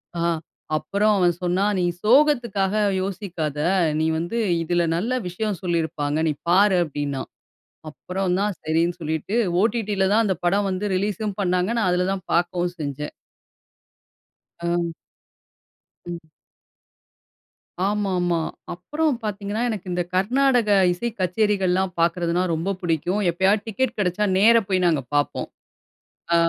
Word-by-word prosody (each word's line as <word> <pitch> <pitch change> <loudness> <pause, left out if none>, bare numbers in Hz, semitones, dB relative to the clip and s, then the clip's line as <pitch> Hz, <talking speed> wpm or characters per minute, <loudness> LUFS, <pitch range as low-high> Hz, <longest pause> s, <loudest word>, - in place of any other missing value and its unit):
ஆ. - - -3 0.6
அப்புறம் 200 +8 +1
அவன் 175 -2 +3
சொன்னான் 190 +4 +1
"நீ 180 - +1 0.2
சோகத்துக்காக 235 -6 +3 0.2
யோசிக்காத! 175 -6 -4 0.4
நீ 160 - +1
வந்து 175 +8 -3 0.3
இதில 175 +1 +1
நல்ல 205 +9 -1 0.2
விஷயம் 195 +1 -3
சொல்லியிருப்பாங்க, 160 -4 -1
நீ 150 - +1 0.2
பாரு" 190 +2 +5
அப்பிடின்னான். 145 -3 -4 0.6
அப்புறம் 180 +4 -2
தான் 205 -1 0
சரின்னு 165 +2 0
சொல்லிட்டு 160 +5 -3 0.3
OTTல 215 -3 0
தான் 225 +2 +4
அந்த 190 -2 +1
படம் 200 +3 +2
வந்து 185 +2 -2
ரிலீஸ்ம் 205 +1 -2
பண்ணாங்க. 180 +1 +1
நான் 215 -5 +2
அதில 180 +1 +1
தான் 190 -2 -5
பார்க்கவும் 175 +1 +1
செஞ்சேன். 145 0 -4 1.5
அ. 170 0 -1 1.1
ம். 175 -1 -5 1.7
ஆமா, 205 -1 0
ஆமா. 175 -1 +1 0.3
அப்புறம் 300 - -1
பார்த்தீங்கன்னா, 205 +1 -3
எனக்கு 210 -5 -4
இந்த 175 0 0
கர்நாடக 245 +4 +2 0.2
இசை 235 +7 -3
கச்சேரிகள்லாம் 190 -1 +1
பார்க்கிறதுனா 170 +1 +1
ரொம்ப 165 +4 -2
புடிக்கும். 175 +3 0
எப்பயாவது 195 +4 +2
டிக்கெட் 235 +3 -1
கிடைச்சா 195 +1 +1
நேர 225 +4 +6
போய் 185 -2 +2
நாங்க 155 -5 +1
பார்ப்போம். 145 0 0 0.8
ஆ - - +6
185 Hz, 120 wpm, -23 LUFS, 170-210 Hz, 1.7 s, நேர